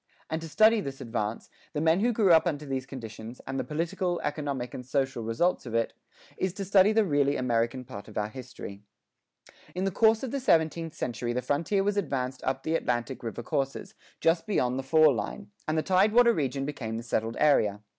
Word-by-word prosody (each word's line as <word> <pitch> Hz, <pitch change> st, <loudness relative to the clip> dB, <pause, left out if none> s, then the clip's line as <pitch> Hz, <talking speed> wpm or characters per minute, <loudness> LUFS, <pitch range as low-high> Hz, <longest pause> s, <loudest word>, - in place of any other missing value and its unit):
And 160 Hz, +1 st, -1 dB
to 165 Hz, -, -7 dB
study 220 Hz, +6 st, +5 dB
this 135 Hz, -4 st, -6 dB
advance, 115 Hz, -2 st, -4 dB, 0.2 s
the 150 Hz, -, -1 dB
men 160 Hz, +3 st, +3 dB
who 240 Hz, +4 st, +2 dB
grew 210 Hz, -6 st, +4 dB
up 165 Hz, +2 st, +5 dB
under 150 Hz, -3 st, -2 dB
these 135 Hz, -1 st, -3 dB
conditions, 115 Hz, -2 st, -8 dB
and 135 Hz, -, -3 dB
the -, -, 0 dB
political, 170 Hz, +3 st, -2 dB
economic, 145 Hz, -5 st, -3 dB
and 125 Hz, -, -6 dB
social 135 Hz, -1 st, -1 dB
results 115 Hz, +8 st, 0 dB
of 115 Hz, -, -4 dB
it, 115 Hz, 0 st, +1 dB, 0.4 s
is 185 Hz, -2 st, -1 dB
to 195 Hz, 0 st, -5 dB
study 195 Hz, +1 st, +5 dB
the 220 Hz, -1 st, +3 dB
really 145 Hz, -4 st, +2 dB
American 120 Hz, +1 st, 0 dB
part 100 Hz, -5 st, -9 dB
of 110 Hz, -, -10 dB
our 105 Hz, 0 st, -1 dB
history. 120 Hz, -5 st, -9 dB, 0.9 s
In 185 Hz, -, -1 dB
the 195 Hz, -, +1 dB
course 220 Hz, +4 st, +3 dB
of 260 Hz, -, -3 dB
the 280 Hz, -, -1 dB
seventeenth 165 Hz, -, +1 dB
century 120 Hz, -3 st, -3 dB
the 125 Hz, +1 st, -2 dB
frontier 165 Hz, -, +1 dB
was 205 Hz, +1 st, 0 dB
advanced 135 Hz, -8 st, -2 dB
up 130 Hz, 0 st, -1 dB
the 160 Hz, -, -1 dB
Atlantic 125 Hz, -4 st, -1 dB
river 120 Hz, 0 st, -5 dB
courses, 135 Hz, -, -2 dB, 0.3 s
just 165 Hz, +3 st, +2 dB
beyond 130 Hz, -10 st, +1 dB
the 135 Hz, 0 st, -7 dB
"fall 155 Hz, -2 st, +6 dB
line," 120 Hz, -, -5 dB, 0.2 s
and 155 Hz, +1 st, 0 dB
the 155 Hz, -, +1 dB
tidewater 215 Hz, +6 st, +5 dB
region 135 Hz, -, -1 dB
became 120 Hz, -6 st, -4 dB
the 115 Hz, -, -5 dB
settled 115 Hz, -1 st, -2 dB
area. 105 Hz, -9 st, +3 dB
145 Hz, 205 wpm, -28 LUFS, 125-180 Hz, 0.9 s, fall